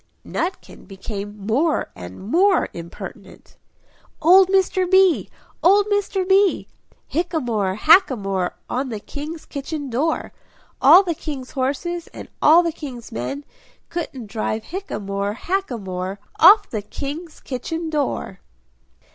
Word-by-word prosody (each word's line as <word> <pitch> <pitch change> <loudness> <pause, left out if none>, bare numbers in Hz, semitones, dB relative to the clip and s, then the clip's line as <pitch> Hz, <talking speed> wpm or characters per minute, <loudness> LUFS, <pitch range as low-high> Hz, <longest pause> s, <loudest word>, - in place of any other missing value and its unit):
Nutkin 365 +2 -5
became 205 +1 -7
more 245 +11 0
and 90 +1 -9
more 350 - +2
impertinent 170 0 -10 0.6
"Old 365 +4 +6
Mr. 375 -1 +2
B! 380 -2 +4 0.3
Old 400 +3 +5
Mr. 395 -2 -1
B! 390 0 +3 0.5
Hickamore, 245 - -1
Hackamore, 215 - +3
on 260 +2 -2
the 220 -3 -4
King's 305 +8 -7
kitchen 285 -1 -5
door; 300 +8 -1 0.5
All 380 - +8
the 350 -3 -1
King's 285 -5 -7
horses, 290 +6 -2
and - - -11
all 325 +4 +7
the 335 - 0
King's 265 -7 -9
men, 275 - -4 0.4
Couldn't 305 -8 -5
drive 215 +1 -3
Hickamore, 205 - -4
Hackamore, 205 - -3 0.2
Off 410 +5 +8
the 215 - -4
King's 300 - -7
kitchen 320 +6 -4
door." 280 - -2
290 Hz, 115 wpm, -21 LUFS, 215-350 Hz, 0.6 s, All